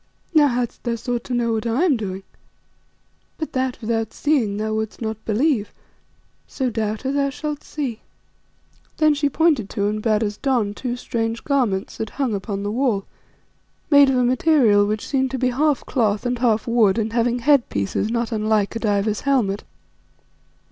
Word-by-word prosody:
Now 300 -2 +6
hadst 245 -2 -2
thou 235 -2 -1
sought 240 +1 -3
to 250 - -2
know 235 -1 +1
what 220 +1 -2
I 235 +8 +1
am 330 -7 +4
doing 195 -4 -5 1.1
But 315 - -5
that, 260 -1 -1
without 225 -1 -2
seeing, 250 -10 +1
thou 215 +1 -2
wouldst 220 0 -3
not 220 -1 -4
believe, 225 0 +1 0.8
so, 260 -3 -2
Doubter, 220 +4 -2
thou 280 0 +1
shalt 295 +1 -5
see." 260 -7 -4 1.0
Then 310 -1 +4
she 290 0 0
pointed 290 -9 +2
to 200 - -1
and 210 +1 -1
bade 215 0 +1
us 205 -1 -3
don, 245 -7 0
two 245 +3 -4
strange 230 -2 -3
garments 240 -9 0
that 220 - -3
hung 265 -5 0
upon 200 0 -3
the 205 - -2
wall, 230 -5 0 0.9
made 285 -1 +7
of 265 - +2
a 250 - +3
material 245 -5 +4
which 210 0 -3
seemed 265 -1 +1
to 265 - -3
be 255 0 +1
half 285 +3 +1
cloth 215 -4 0
and 245 -1 -1
half 225 -3 +2
wood 230 -4 +3
and 220 0 -1
having 235 +1 +1
headpieces 235 - +1
not 235 +1 -1
unlike 215 -1 0
a - - -2
diver's 210 -1 0
helmet. 230 -8 +1
235 Hz, 175 wpm, -22 LUFS, 215-265 Hz, 1.1 s, made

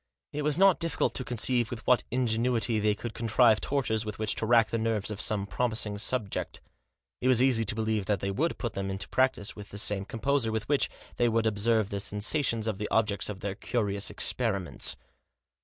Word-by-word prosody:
It 150 - -2
was 150 0 +1
not 195 -1 +5
difficult 165 -2 0
to 130 - +1
conceive 120 -1 +1
with 115 -1 -7
what 125 - +4
ingenuity 120 -2 +1
they 105 0 +2
could 115 +1 -6
contrive 115 -1 +3
tortures 120 -6 0
with 105 -1 -6
which 110 -1 0
to 110 - -2
rack 115 -1 +4
the 115 - 0
nerves 110 -2 -1
of 105 - -3
some 105 -2 +1
promising 110 0 -1
subject. 110 -2 -2 0.6
It 125 - 0
was 130 -2 +4
easy 125 -3 +3
to 105 - 0
believe 110 -3 -1
that 105 -3 +1
they 100 +2 -2
would 155 +12 -1
put 120 -4 -4
them 95 0 -3
into 95 0 -4
practice 130 -5 0
with 105 -1 -10
the 100 - -9
same 100 -1 0
composure 115 +2 0
with 110 -1 -3
which 145 -1 +2 0.3
they 120 -1 +3
would 115 0 +1
observe 110 0 +1
the 100 - -2
sensa 105 +9 +1
tions 115 -4 -1
of 110 -3 -2
the 105 - -3
object 105 -3 +1
of 100 -2 -6
their 100 -1 -3
curious 100 -2 -2
experiments. 100 -8 0
110 Hz, 205 wpm, -28 LUFS, 105-125 Hz, 0.6 s, not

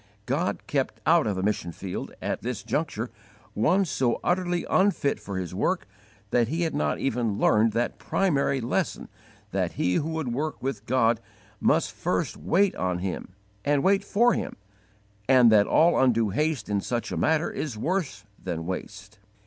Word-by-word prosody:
God 150 +8 -1
kept 135 -2 -1
out 165 -5 +4
of 105 - 0
the 95 - -2
mission 100 -4 -1
field, 90 +2 -6
at - - -2
this - - -4
juncture, - - -2 0.4
one 185 - +3
so 130 -7 0
utterly 175 -1 0
unfit 190 -7 +2
for 100 -2 -6
His 90 -1 -4
work 180 - 0 0.5
that 120 -2 +3
he 165 +7 -1
had 165 - -1
not 75 -1 0
even 115 -5 -1
learned 110 +2 +4
that 120 +2 -1
primary 140 -7 +1
lesson 115 - -2 0.4
that - - -1
he 90 - 0
who 150 - 0
would 160 -7 -2
work 155 +5 -2
with 120 -5 -4
God 115 -2 +3 0.4
must - - +2
first - - -1
wait 195 +3 +2
on 90 -1 -1
Him 90 0 -5 0.3
and 145 -1 +2
wait 195 +1 +3
for 235 +4 +3
Him, - - -3 0.7
and 125 -3 +7
that 105 -2 +5
all 170 +2 +4
undue 115 -4 +3
haste 150 -1 -1
in 100 -1 0
such 120 +2 -3
a - - -2
matter 160 +1 +1
is 135 -8 -4
worse 145 - -2 0.2
than 85 -3 -3
waste. 100 +3 -7
125 Hz, 170 wpm, -26 LUFS, 105-160 Hz, 0.7 s, and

